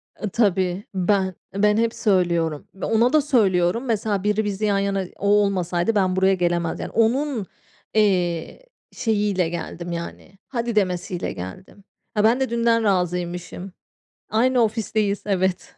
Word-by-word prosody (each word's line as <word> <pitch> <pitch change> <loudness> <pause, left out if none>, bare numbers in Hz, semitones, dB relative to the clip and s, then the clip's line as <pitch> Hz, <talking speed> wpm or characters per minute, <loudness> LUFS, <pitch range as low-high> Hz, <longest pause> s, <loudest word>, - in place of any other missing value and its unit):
A, 210 - -4
tabii 190 -3 +1
ben, 190 0 +1 0.2
ben 210 +1 +3
hep 230 0 +1
söylüyorum 170 - 0
ve 190 - -5
ona 230 +4 +2
da 310 - +5
söylüyorum. 215 -5 +2
Mesela 210 -4 -1
biri 210 +1 +1
bizi 205 +1 -2
yan 200 -1 +2
yana 195 -1 -1
o 200 - -3
olmasaydı 200 -1 +2
ben 185 -2 +2
buraya 190 +1 +3
gelemezdim. 175 -2 -1
Yani, - - -6
onun, 235 0 +1 0.5
eee, 185 - 0 0.3
şeyiyle 205 -6 0
geldim, 170 0 -5
yani, 170 +3 -7
"Hadi" 235 -3 -3
demesiyle 180 -3 -1
geldim. 95 - -9 0.4
Ben 235 +4 +4
de 265 - 0
dünden 230 -1 +2
razıymışım. 180 -1 -2 0.6
Aynı 245 +3 +2
ofisteyiz, 215 -2 -1
evet. 190 -2 -1
200 Hz, 135 wpm, -23 LUFS, 180-220 Hz, 0.6 s, da